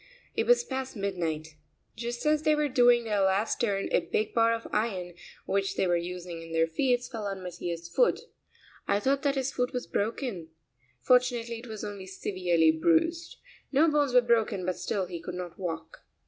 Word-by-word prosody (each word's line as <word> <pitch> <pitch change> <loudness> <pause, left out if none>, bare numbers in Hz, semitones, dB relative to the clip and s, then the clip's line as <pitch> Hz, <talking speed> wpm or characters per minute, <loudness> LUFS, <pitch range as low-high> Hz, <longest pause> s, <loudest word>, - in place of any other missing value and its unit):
It - - 0
was 485 0 +5
past 265 - -4
midnight. 170 -6 -2 0.5
Just 240 +2 -5
as 300 0 +3
they 310 0 +3
were 300 0 +1
doing 245 -2 +5
their 210 -3 0
last 195 +3 +1
turn 200 -4 0
a - - +4
big 215 - -2
bar 230 0 +4
of 230 0 -2
iron 190 -5 -1 0.3
which 195 0 0
they - - +1
were 175 -1 +2
using 175 -1 -5
in 165 0 -9
their 165 0 +3
feats 245 +9 0
fell 220 -4 -5
on 195 -1 -5
Mattia's 170 -1 -5
foot. 470 - +2 0.7
I 200 - +2
thought 270 +5 +1
that 280 -2 +1
his 270 0 -1
foot 250 0 -1
was 250 - -3
broken. 205 - -3 0.5
Fortunately 245 -2 +2
it 245 - -11
was 220 -2 -7
only 200 -2 -6
severely 180 -4 +2
bruised. 170 - +1 0.3
No 295 +4 +4
bones 295 -3 +2
were 250 - +8
broken, 225 -5 +1
but 185 0 -1
still 195 -3 -2
he 175 -2 -7
could 180 +1 -6
not 180 -1 -7
walk. 165 -3 -5
210 Hz, 190 wpm, -28 LUFS, 180-250 Hz, 0.7 s, were